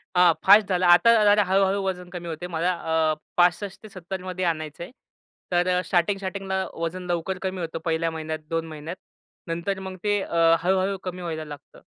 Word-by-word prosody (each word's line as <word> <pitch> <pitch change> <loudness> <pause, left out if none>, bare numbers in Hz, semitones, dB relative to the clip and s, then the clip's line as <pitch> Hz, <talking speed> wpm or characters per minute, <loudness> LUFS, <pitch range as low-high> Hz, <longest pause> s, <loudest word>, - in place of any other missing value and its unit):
अ, 180 -1 +6
fast 205 +1 +7
झालं. 185 -1 +1
आता 175 +7 +7
जरा 205 0 +5
हळू-हळू 195 +1 +2
वजन 180 -2 -4
कमी 175 -1 -7
होतंय 165 +2 -5
मला 175 +1 0 0.4
अ, - - -1 0.2
65 180 +4 +1
ते 215 - -10
70मध्ये 185 -1 -5
आणायचंय. 155 +1 -3 0.6
तर 175 0 +2
अ - - +1
स्टार्टिंग-स्टार्टिंगला 190 +1 -1
वजन 170 +2 -4
लवकर 175 +2 -2
कमी 190 -1 -3
होतं 165 0 -4
पहिल्या 165 0 0
महिन्यात 155 0 -4
2 165 0 -1
महिन्यात 155 +3 -7 0.5
नंतर 170 +4 -2
मग 190 -1 -7
ते 205 -1 +1
अ, 165 -1 +3
हळू-हळू 190 +2 +1
कमी 180 -1 -5
व्हायला 160 -2 -4
लागतं. 145 -1 -12
180 Hz, 170 wpm, -24 LUFS, 165-190 Hz, 0.6 s, fast